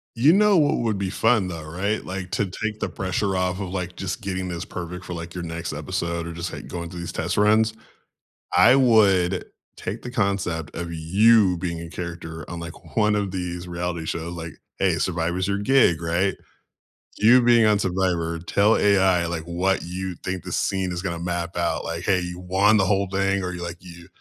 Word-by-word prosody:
You 140 +8 +5
know 210 -1 +5
what 150 -3 +3
would 110 -4 0
be 95 -1 -2
fun, 110 -1 +2
though. 85 -3 -6
Right? 95 +7 -2
Like, 95 -1 -6
to 105 - 0
take 105 +3 -4
the - - -2
pressure 95 +1 -1
off 90 0 -1
of, 95 - -4
like, 90 -2 -4
just 95 +4 -4
getting 95 -2 -3
this 85 -1 -4
perfect 90 +1 -7
for, 90 - -6
like, 85 0 -7
your 90 - -5
next 85 0 -5
episode 85 0 -3
or 85 - -6
just, 85 +1 -4
like, - - -8
going 85 -1 -5
through 90 0 -8
these 85 - -5
test - - -2
runs. 110 +1 +4 0.8
I 90 +8 +7
would 100 -8 +4 0.3
take - - -5
the 125 - -7
concept 95 - -1
of 85 0 -4
you 95 +5 +4
being 85 -2 -3
a 85 - -8
character 85 -2 -7
on, 85 - -5
like, 85 0 -10
one 105 -1 +3
of 100 -2 -1
these 90 -1 -4
reality 85 -1 -3
shows, 85 +2 -4
like 85 -2 -7 0.3
Hey, 95 -3 +3
Survivor's 85 +2 -1
your 100 +1 0
gig, 100 -6 +3
right? 85 +4 0 0.8
You 120 +4 +6
being 120 -1 +5
on 105 -1 +4
Survivor, 90 -4 -1
tell 100 +5 +3
AI, 95 -4 +3
like, 85 -1 -3
what 90 +3 0
you 90 +1 -5
think 90 -1 -3
the - - -5
scene 95 -2 0
is 85 - -3
gonna 85 -3 -3
map 85 0 -3
out, 85 -2 0
like, 85 +1 -4
"Hey, 95 -2 +2
you 90 0 -6
won 95 +4 +3
the 95 - +3
whole 100 0 +1
thing," 95 0 +1
or 90 - -2
you're 90 -1 -5
like, 85 0 -5
"You 85 -1 -12
90 Hz, 205 wpm, -24 LUFS, 85-100 Hz, 0.8 s, I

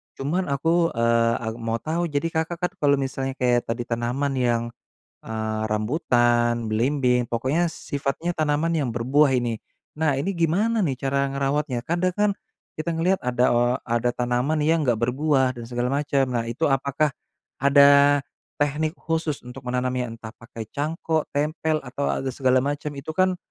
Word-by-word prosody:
cuman 170 +7 -1
aku, 165 +4 +1
eee 115 0 +3
ah, 110 - -2
mau 115 0 -2
tahu 165 +8 -2
jadi 155 +2 -1
Kakak 160 +2 -1
kan 180 +1 -2
kalau 145 -2 +4
misalnya 135 -1 -3
kayak 125 -2 +1
tadi 115 +1 -2
tanaman 120 +4 -1
yang, 120 -2 +1 0.6
eee 110 -1 -3
rambutan, 120 -1 +1
belimbing, 125 +2 +1
pokoknya 130 +9 0
sifatnya 145 +5 -3
tanaman 155 +2 +1
yang 145 -5 0
berbuah 135 +5 +3
ini. 120 -2 -2 0.4
Nah 150 -3 +1
ini 190 +5 -2
gimana 200 +7 +1
nih 135 -6 -1
cara 140 0 0
ngerawatnya? 140 -1 -1
Kadang 175 +8 0
kan 210 +2 +2 0.4
kita 155 +2 -5
ngeliat 180 +4 +1
ada, 125 0 0
eee, 120 +1 +2
ada 120 +1 0
tanaman 125 +5 0
yang 165 +2 +3
enggak 120 -2 +3
berbuah 130 +1 +2
dan 120 - -6
segala 120 +1 -1
macem, 140 -1 +1
nah 115 -1 -1
itu 120 +8 -2
apakah 140 +1 +1 0.5
ada 140 0 +6 0.3
tehnik 150 +3 -1
khusus 160 -4 -2
untuk 125 +2 -9
menanamnya? 125 0 -1
Entah 115 -1 -9
pakai 115 -1 -9
cangkok, 155 +1 -1
tempel 155 +1 0
atau, 135 +3 -3
a - - -2
segala 130 0 +2
macem 145 +1 -2
itu 140 +3 -6
kan 185 +2 +2
140 Hz, 160 wpm, -24 LUFS, 120-155 Hz, 0.6 s, ada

